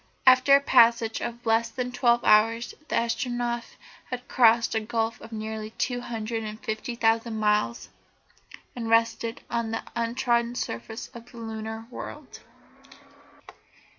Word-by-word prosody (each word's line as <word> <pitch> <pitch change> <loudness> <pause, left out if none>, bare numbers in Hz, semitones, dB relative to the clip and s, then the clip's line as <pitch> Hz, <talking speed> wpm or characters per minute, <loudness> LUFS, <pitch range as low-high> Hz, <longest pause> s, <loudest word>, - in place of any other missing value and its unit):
After 255 +2 +7
a - - +6
passage 230 -4 +4
of 235 0 -5
less 225 +1 +2
than 250 +1 -4
twelve 240 -1 +2
hours 225 +2 +3
the - - -2
Astronef 240 +1 -2 0.3
had 250 0 -6
crossed 230 -1 +4
a 220 - +2
gulf 225 +1 -2
of 225 - -11
nearly 220 0 -5
two 245 -2 -1
hundred 225 -1 -4
and 215 0 -6
fifty 220 +2 -4
thousand 225 0 +1
miles, 210 +2 0 0.9
and 230 -2 -4
rested 230 0 +1
on 235 -1 -1
the 225 - -3
untrodden 235 0 0
surface 225 -2 -5
of 235 -2 -13
the 235 - -13
lunar 220 0 -6
world. - - -9
230 Hz, 135 wpm, -26 LUFS, 225-240 Hz, 0.9 s, After